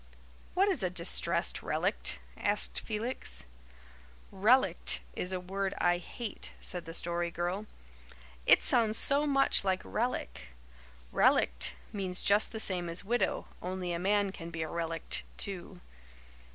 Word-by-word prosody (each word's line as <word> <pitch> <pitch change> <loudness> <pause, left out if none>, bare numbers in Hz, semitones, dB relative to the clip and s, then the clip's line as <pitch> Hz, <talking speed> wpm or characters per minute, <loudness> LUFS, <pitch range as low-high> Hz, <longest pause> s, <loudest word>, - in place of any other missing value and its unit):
"What 385 +2 +4
is 380 - +1
a 185 - +1
'distressed 175 0 +2
relict'?" - - 0 0.2
asked 205 +1 +2
Felix. 225 +4 -2 0.9
"'Relict' 225 +7 +3
is 180 - -3
a 185 - -2
word 195 +2 -3
I 175 0 +2
hate," 220 +4 -6
said 180 -1 -4
the 165 0 -7
Story 170 0 -1
Girl. 175 +5 -3 0.8
"It - - +7
sounds 225 -2 +2
so 285 +2 +3
much 275 -6 +3
like 190 -1 0
relic. 230 - -3 0.6
Relict 60 +1 +3 0.2
means 190 -3 -2
just 205 +2 +4
the 220 - -5
same 180 -5 0
as 170 +3 +1
widow, 240 +3 0
only 180 -1 -3
a 170 - -2
man 200 +1 +1
can 170 -3 -8
be 165 -1 -4
a - - -4
relict, 165 0 -2 0.2
too." 185 -2 -2
190 Hz, 140 wpm, -31 LUFS, 175-215 Hz, 0.9 s, It